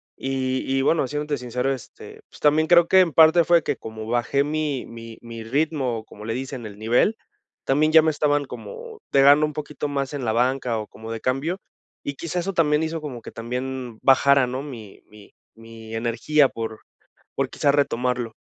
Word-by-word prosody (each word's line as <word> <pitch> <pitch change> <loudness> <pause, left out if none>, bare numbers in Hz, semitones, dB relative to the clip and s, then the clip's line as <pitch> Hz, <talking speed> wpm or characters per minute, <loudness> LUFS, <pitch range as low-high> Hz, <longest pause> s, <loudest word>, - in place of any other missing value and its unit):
Y 130 -1 -2 0.2
y 135 - +2
bueno, 155 -1 +2
siéndote 150 +1 -2
sincero, 125 +2 -1
este, 125 -5 -11
pues, - - -16
también 155 +2 +3
creo 170 0 +6
que 190 - +5
en 175 -4 +3
parte 160 +2 +6
fue 170 0 +4
que - - -2
como 110 0 -8
bajé 120 +4 +1
mi 150 -3 -2
mi 115 -1 -10
mi 115 -1 -8
ritmo, 130 -3 -1
como 105 -1 -12
le 115 - -2
dicen, 130 -2 -5
el 100 -1 -11
nivel, 120 - +2 0.5
también 150 +3 +2
ya 160 0 +8
me 160 - +2
estaban 145 -1 +1
como 470 - -9
pegando 140 +2 +6
un 150 - -7
poquito 150 0 -5
más 140 -1 -3
en 140 -2 -4
la 110 -2 0
banca, 125 0 +1
o 105 -1 -5
como 110 0 -10
de 115 - -4
cambio, 145 +9 -1 0.5
y 140 - -3
quizás 170 +3 -3
eso 195 +3 -3
también 155 -3 +2
hizo 160 0 -3
como 135 -6 -7
que - - -10
también 125 0 -5
bajara, 135 0 +5
¿no?, 130 +2 -4
mi 115 -8 -10
mi 105 -1 -17 0.2
-mi 115 0 -10
energía 120 +6 +2
por 110 -1 -6 0.6
por, - - -1
quizá, 145 - +1
retomarlo. 125 -4 0
135 Hz, 190 wpm, -23 LUFS, 115-150 Hz, 0.6 s, ya